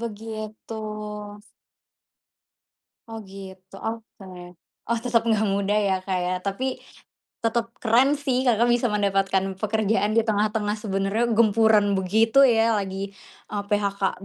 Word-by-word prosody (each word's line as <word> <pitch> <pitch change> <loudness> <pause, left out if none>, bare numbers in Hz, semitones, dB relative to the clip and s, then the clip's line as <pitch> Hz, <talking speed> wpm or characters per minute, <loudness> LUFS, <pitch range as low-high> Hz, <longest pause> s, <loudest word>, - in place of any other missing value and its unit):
begitu. 220 -1 -7 2.3
Oh, 225 -1 -8
gitu, 190 -1 -12
oke. 225 -2 -7 0.6
Oh, 235 0 +1
tetap 235 -1 +1
enggak 220 -2 +1
mudah, 200 +1 +1
ya, 195 -2 +1
Kak, 185 -1 -1
ya. 180 +1 -1
Tapi, 255 +7 -2 0.7
tetap 230 0 -1
keren, 250 +5 +3
sih, 265 -3 -1
Kakak 235 -1 +3
bisa 240 0 +2
mendapatkan 195 -2 0
pekerjaan 215 0 0
di 230 - +4
tengah-tengah 210 -1 0
sebenarnya 200 +3 -1
gempuran 215 -2 +4
begitu, 220 +7 +3
ya. 225 -1 +3
Lagi, 195 -1 -3 0.4
eee, 205 -1 -2
PHK 200 -2 -1
215 Hz, 120 wpm, -24 LUFS, 195-230 Hz, 2.3 s, di